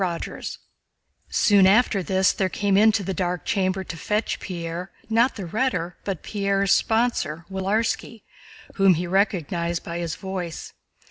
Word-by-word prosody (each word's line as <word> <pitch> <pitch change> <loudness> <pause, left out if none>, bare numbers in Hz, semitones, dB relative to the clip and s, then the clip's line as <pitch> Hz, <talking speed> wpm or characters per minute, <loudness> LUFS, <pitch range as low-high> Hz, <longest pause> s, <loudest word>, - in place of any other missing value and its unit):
CHAPTER 170 -2 -3
IV - - -6 0.7
Soon 200 -3 +5
after 205 0 +4
this 190 +1 +2
there 190 -1 0
came 200 +1 0
into 215 0 +4
the 190 +1 -2
dark 180 -1 -2
chamber 190 -1 0
to 170 - -7
fetch 210 +6 -1
Pierre, 175 0 -5 0.2
not 235 +3 +3
the 200 - -5
Rhetor 180 -4 -1
but 190 -6 -4
Pierre's 200 -1 0
sponsor, 220 -9 +1
Willarski, 210 +3 -1 0.5
whom 195 -2 +5
he 175 +3 -2
recognized 175 -3 0
by 170 0 -5
his 170 -2 -3
voice. 185 -3 -6
190 Hz, 145 wpm, -24 LUFS, 175-205 Hz, 0.7 s, Soon